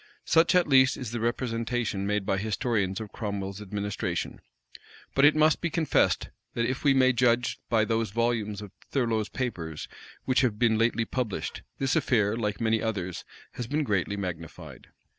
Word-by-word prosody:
Such 165 +3 +4
at 180 - +4
least 130 -2 +5
is 125 -4 -5
the 120 - -3
representation 115 -3 -1
made 105 -1 0
by 95 - 0
historians 105 -2 -1
of 110 -2 -7
Cromwell's 100 -2 -4
administration: 105 0 -3 0.7
but 135 - +5
it 150 - +6
must 155 0 +4
be 170 - 0
confessed, 160 -1 +1 0.3
that, 115 - +1
if 130 +2 -2
we 140 -2 +4
may 130 -1 +5
judge 120 0 +2
by 110 -2 +3
those 115 0 0
volumes 110 -1 -1
of 100 - -10 0.2
Thurloe's 115 -5 0
papers 85 - -4 0.4
which 130 - +3
have 120 -5 +1
been 115 -1 +3
lately 115 0 +2
published, 120 -4 -3 0.2
this 135 -1 0
affair, 110 -4 +2
like 105 -3 -2
many 110 -1 +1
others, 95 -6 -3 0.3
has 120 - -6
been 150 +4 0
greatly 100 -4 0
magnified. 85 -4 -7
115 Hz, 165 wpm, -27 LUFS, 105-125 Hz, 0.7 s, it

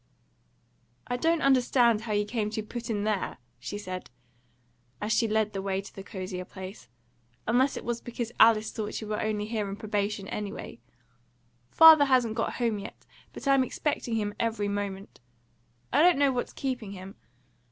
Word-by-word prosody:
"I 245 - -2
don't 330 +5 +1
understand 245 -4 +4
how 220 -1 -3
you 205 0 +1
came 210 -1 -2
to 220 0 -3
be - - -18
put 240 +1 -6
in 205 -2 -1
there," 210 -2 -1 0.2
she 205 - -5
said, 185 -3 -6 0.9
as 210 +1 -1
she 230 - +2
led 215 -1 +1
the 195 - -3
way 195 -1 -1
to 200 - -9
the 195 - -8
cozier 185 -2 -6
place, 185 - -10 0.6
"unless 255 +5 +2
it - - -7
was 240 -1 -2
because 235 -1 -5
Alice 220 -1 +5
thought 215 -2 -4
you 220 - -6
were 210 0 -2
only 215 -1 -1
here 215 -2 -2
on 195 - -4
probation, 205 -2 -2
anyway. 205 - -6 0.9
Father 320 - +9
hasn't 250 -5 +3
got 225 0 -1
home 230 -4 -1
yet, - - -10 0.3
but - - -8
I'm 275 -1 +5
expecting 255 -3 -2
him 205 -2 -1
every 225 -3 0
moment; 200 -1 -4 0.7
I 285 - +5
don't 350 -2 +6
know 280 -1 +4
what's 245 -1 -3
keeping 245 -7 -4
him. 190 0 -9
215 Hz, 175 wpm, -28 LUFS, 205-245 Hz, 0.9 s, Father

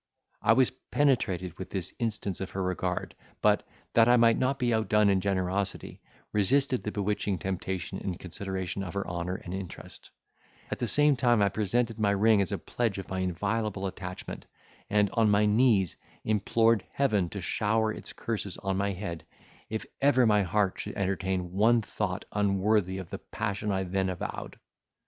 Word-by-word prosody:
I 115 - +5
was 130 +1 +4 0.2
penetrated 95 - +1
with 95 - -6
this 95 -4 -4
instance 105 -5 -2
of 95 - -3
her 95 - -3
regard, 90 -1 -2 0.3
but, - - +3 0.3
that 115 0 +6
I 120 0 +6
might 115 -1 +5
not 135 +2 +1
be 120 -3 +1
outdone 105 -2 +3
in 95 -1 +2
generosity, 95 0 -2 0.3
resisted 130 +6 +2
the 105 - -4
bewitching 105 -1 -1
temptation 95 0 -3
in 95 -3 -4
consideration 95 +1 -4
of 95 -1 -6
her 100 - -2
honour 85 +1 -3
and 90 -1 -7
interest; 95 -2 -7 0.6
at - - -3
the 120 - -1
same 150 +3 +4
time 120 -3 +3
I 100 -1 +4
presented 115 +3 0
my 105 -2 +3
ring 100 +1 +4
as 95 - -1
a - - 0
pledge 115 -5 -2
of 95 - -6
my 95 - -2
inviolable 95 +3 -1
attachment, 90 -1 -6 0.4
and, 105 -1 +3
on 115 -2 +3
my 105 +1 +4
knees, 105 -4 +3 0.3
implored 110 0 +2
Heaven 105 -11 +1
to 100 - -6
shower 110 +4 +1
its - - -6
curses 105 -5 -4
on 95 -1 -2
my 100 0 0
head, 85 -4 -5 0.5
if 110 0 -3 0.2
ever 135 -3 +5
my 105 -2 +4
heart 100 +1 0
should - - -5
entertain 95 -2 -1
one 110 +4 +4
thought 100 -3 -3
unworthy 100 -1 +1
of 95 -3 -7
the - - -5
passion 105 -1 -3
I 95 -1 0
then 95 +1 -1
avowed. 90 - -5
100 Hz, 170 wpm, -29 LUFS, 95-110 Hz, 0.6 s, that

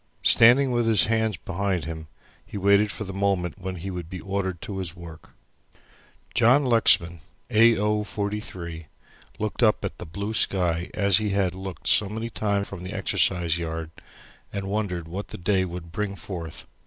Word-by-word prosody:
Standing 125 +4 +6
with 120 -1 +1
his 110 -3 +4
hands 110 -1 0
behind 95 -3 -2
him, 80 -1 -6 0.4
he - - -8
waited 100 +2 +4
for - - -5
the 95 -2 -7
moment 95 -1 -1
when 95 0 -5
he 95 +3 -6
would 90 -3 -6
be 90 0 -6
ordered 95 -3 -3
to 100 -2 -5
his 90 -3 -4
work. 85 -2 -12 1.0
John 130 +5 +4
Lexman 90 -8 +4 0.3
A. 115 +1 +6
O. 105 +1 +1
43 95 -6 -5 0.5
looked 110 +2 -3
up 110 -3 +3
at - - -6
the - - -7
blue 100 +6 -4
sky 90 -5 +1
as 100 -1 +4
he 105 -1 -1
had 95 -3 +1
looked 95 -1 -8
so 105 - +4
many 110 +2 -5
times 100 -2 -1
from 100 -3 -8
the 90 - -6
exercise 85 -3 +1
yard, 80 -1 -4 0.6
and 100 -1 -4
wondered 95 -5 -2
what 95 +5 -5
the - - -8
day 95 +1 +1
would 85 -2 -7
bring 100 +2 -3
forth. 85 -5 -7
95 Hz, 175 wpm, -25 LUFS, 85-105 Hz, 1.0 s, Standing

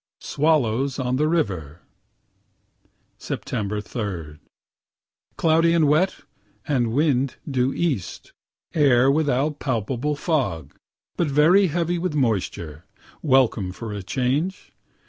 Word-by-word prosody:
SWALLOWS 140 -4 +1
ON 130 -1 -1
THE 150 +2 +2
RIVER 90 - -2 1.4
Sept. 105 0 -4
3 90 -10 -5 1.0
Cloudy 165 +1 +3
and 160 -3 +4
wet, 160 +6 +2 0.5
and 125 -6 +1
wind 135 -1 +1
due 130 -2 +1
east; 140 - -3 0.4
air 135 -4 +4
without 145 0 0
palpable 130 +3 -1
fog, 130 - -2 0.4
but 170 - +1
very 160 +8 +4
heavy 175 +1 -1
with 180 -3 -2
moisture 90 - -2 0.3
welcome 130 - +2
for 110 +3 -7
a 100 - -5
change. 135 - -2
135 Hz, 105 wpm, -23 LUFS, 110-155 Hz, 1.4 s, and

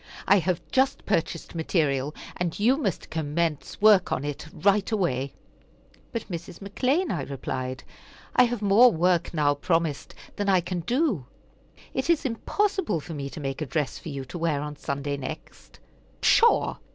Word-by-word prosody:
I 200 +1 +6
have 180 -1 -1
just 265 +1 +1
purchased 170 -4 -1
material, 150 -4 0 0.2
and 175 -2 -2
you 240 +6 +4
must 215 - -3
commence 160 0 -2
work 205 -3 +5
on 135 - -1
it 145 +1 -5
right 200 +3 +2
away." 140 - -1 0.8
"But 230 - -4
Mrs. 170 -2 -6
McClean," 255 - 0
I 170 - -1
replied, 130 -1 -4 0.5
"I 250 - +7
have 240 -3 -3
more 215 +5 +7
work 175 -1 +1
now 150 -3 +2
promised 160 0 -1 0.2
than 205 -1 0
I 190 -2 +5
can 175 +1 -3
do. 225 - 0 0.7
It - - -2
is 335 -4 +3
impossible 380 - 0
for 165 +3 -8
me 140 -2 -4
to 155 - -8
make 135 0 -4
a - - 0
dress 150 +1 -2
for 165 - -8
you 140 -2 -5
to 170 +7 -7
wear 160 -3 +1
on 150 +1 -5
Sunday 140 -1 -3
next." 140 +4 -9 0.4
"Pshaw! 470 0 +4
170 Hz, 165 wpm, -26 LUFS, 145-205 Hz, 0.8 s, I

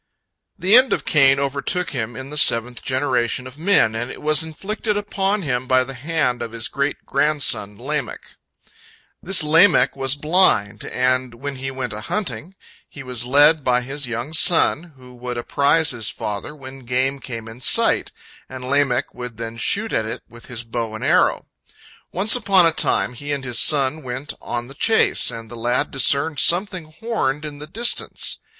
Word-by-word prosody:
The 190 +6 +3
end 255 +1 +5
of - - -3
Cain 135 -3 +4
overtook 140 +6 -2
him 120 -3 -4
in 130 +3 -8
the - - -7
seventh 120 -3 +3
generation 130 -2 -1
of 130 +3 -11
men, 170 - +3
and 120 +3 -4
it - - -9
was 155 0 +2
inflicted 205 +7 -4
upon 205 -1 -2
him 130 -3 -2
by 130 0 +3
the 135 +1 -7
hand 130 -2 -2
of 115 -1 -6
his 115 0 -2
great 140 0 -3
grandson 140 -8 0
Lamech. 140 +1 -5 0.9
This 190 -2 +3
Lamech 165 +4 +4
was 135 0 0
blind, 150 - +1
and 130 -1 -1
when 140 +3 -6
he 135 +1 -5
went 130 -4 -5
a 105 - -6
hunting, 170 - -4 0.3
he 140 - -10
was 125 -2 -3
led 145 +4 +4
by 125 -1 +2
his 135 +2 -5
young 120 +6 -5
son, 165 0 +3
who 125 -1 -15
would 125 0 -5
apprise 145 +6 +2
his 115 -4 -1
father 105 +8 -5
when 135 -2 -11
game 130 +2 -1
came 115 -4 -8
in 115 +3 -11
sight, - - +3 0.4
and 130 -1 -8
Lamech 140 -2 0
would 125 -2 -8
then 115 0 -6
shoot 215 - 0
at 110 - -1
it 115 +2 -7
with 120 0 -15
his 120 -2 -7
bow 115 -1 -4
and 110 - -7
arrow. - - +2 0.7
Once 200 +6 +3
upon 195 -7 +4
a 165 - +4
time 125 - +1
he 145 +4 -7
and 140 -2 -3
his 125 -3 +2
son 145 +1 +3
went 130 +2 -5
on 120 0 -4
the 135 - -12
chase, 220 +10 +2
and 115 -1 -8
the - - -7
lad 120 +2 -1
discerned 140 +2 +1
something 180 -1 0
horned 155 - -3
in 145 -1 -8
the 150 - -9
distance. 235 +8 -2
135 Hz, 180 wpm, -20 LUFS, 125-155 Hz, 0.9 s, end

